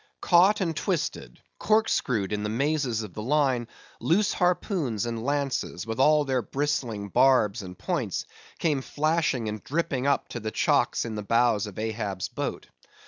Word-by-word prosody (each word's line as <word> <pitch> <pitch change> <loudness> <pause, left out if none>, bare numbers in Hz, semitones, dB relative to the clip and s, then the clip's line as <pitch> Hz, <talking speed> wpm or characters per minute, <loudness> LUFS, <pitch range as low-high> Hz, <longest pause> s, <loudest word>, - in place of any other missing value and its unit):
Caught 190 +4 +5
and 165 -3 -1
twisted—corkscrewed 120 - -1
in 105 - -1
the 105 - -2
mazes 130 -1 0
of 100 -5 -9
the 105 - -6
line, 130 -2 +1 0.3
loose 205 +6 +2
harpoons 175 - 0
and 115 -1 -4
lances, 140 -9 -2
with 115 +2 -4
all 150 +2 +5
their 130 -2 0
bristling 120 -6 -2
barbs 120 -3 +3
and 90 -2 -9
points, - - -2 0.3
came 150 -5 0
flashing 155 -5 0
and 105 -1 -5
dripping 140 -4 -1
up 140 - +1
to 120 - -5
the 110 -1 -3
chocks 110 - +1
in 115 - -4
the 105 - -4
bows 115 -1 +2
of 100 - -10
Ahab's 110 -3 -3
boat. - - -4
125 Hz, 155 wpm, -26 LUFS, 110-150 Hz, 0.3 s, Caught